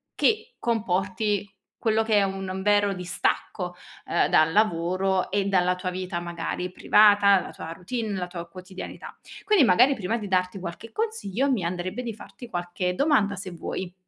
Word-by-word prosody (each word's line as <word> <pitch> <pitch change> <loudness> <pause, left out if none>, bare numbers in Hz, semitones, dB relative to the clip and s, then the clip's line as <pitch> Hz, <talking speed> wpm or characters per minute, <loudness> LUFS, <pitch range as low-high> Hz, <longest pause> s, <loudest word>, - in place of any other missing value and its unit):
che 445 +2 +1
comporti, 205 -2 0 0.3
quello 220 -1 +2
che 220 -1 +1
è 200 - +5
un 190 -1 -3
vero 205 0 +3
distacco, 180 0 -2 0.3
ehm, 170 - +2
dal 155 +1 +4
lavoro 185 -1 +1
e 200 -1 +1
dalla 180 -2 +2
tua 180 0 -4
vita, 185 -1 -4
magari, 175 +1 -4
privata, 205 -2 +5
la - - -7
tua 165 - -8
routine, 215 +6 -4
la 180 - -3
tua 175 -1 -7
quotidianità. 185 +1 -9 0.3
Quindi 415 -9 +5
magari, 255 +7 +5
prima 220 +3 -2
di 210 -3 -6
darti 185 +1 0
qualche 185 +6 -7
consiglio, 280 - -1
mi 225 -9 +1
andrebbe 180 +7 -3
di 230 -2 -4
farti 235 +3 -12
qualche 180 0 -2
domanda, 240 -9 +2
se 185 -1 -6
vuoi. 175 +1 -5
190 Hz, 160 wpm, -25 LUFS, 180-220 Hz, 0.3 s, è